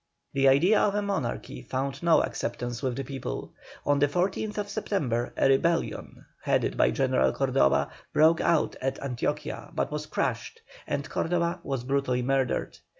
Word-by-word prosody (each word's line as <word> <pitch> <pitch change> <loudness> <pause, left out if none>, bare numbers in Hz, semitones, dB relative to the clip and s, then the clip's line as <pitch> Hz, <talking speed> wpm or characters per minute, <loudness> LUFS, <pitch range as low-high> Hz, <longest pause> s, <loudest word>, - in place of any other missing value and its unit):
The 135 0 +3
idea 170 +11 +5
of 205 - +2
a 210 - 0
monarchy 195 -12 -3
found 135 +1 -3
no 170 -1 +4
acceptance 120 0 -4
with 130 -3 -1
the 135 - -3
people. 135 +1 -6 0.3
On 145 0 +3
the 145 - +4
14th 200 +6 -1
September 150 - -1
a - - +4
rebellion, 165 +5 0 0.2
headed - - +1
by 65 - +4
General 65 +1 +2
Cordoba, 70 +1 +2 0.2
broke 160 +2 +4
out 165 -3 +2
at 135 +1 -1
Antioquia, 125 -4 -3
but - - -1
was - - -4
crushed, - - -3 0.2
and 140 +1 -2
Cordoba 170 +1 0
was 135 -6 -3
brutally 130 -2 0
murdered. 135 -1 0
140 Hz, 150 wpm, -27 LUFS, 130-170 Hz, 0.3 s, idea